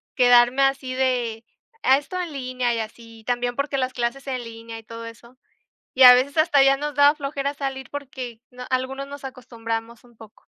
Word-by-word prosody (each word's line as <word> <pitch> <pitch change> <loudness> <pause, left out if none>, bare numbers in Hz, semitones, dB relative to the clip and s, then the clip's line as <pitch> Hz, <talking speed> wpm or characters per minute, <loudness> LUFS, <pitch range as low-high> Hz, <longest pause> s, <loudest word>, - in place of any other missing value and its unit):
quedarme 245 +1 +5
así 270 -1 0
de, 245 -4 -1 0.4
ah, 265 +1 +5
esto 365 +6 -6
en 350 -3 -4
línea 255 -3 -2
y 230 - -2
así. 225 +1 -9
Y 220 - -18
también 245 0 -1
porque 280 0 -1
las 255 -1 -1
clases 240 +3 -3
en 255 -2 -3
línea 230 0 -9
y 225 - -15
todo 230 +1 -9
eso. 235 +2 -13 0.6
Y 265 - +5
a 250 0 +12
veces 275 +5 0
hasta 295 -3 +4
ya 275 0 +5
nos 295 0 -4
daba 285 0 +6
flojera 280 -1 -3
salir 270 -2 -5
porque 260 -5 -7
no 250 0 -10
algunos 260 +2 -2
nos 285 0 -10
acostumbramos 235 -3 -6
un 240 -1 -22
poco. 220 -1 -16
255 Hz, 200 wpm, -23 LUFS, 235-275 Hz, 0.6 s, a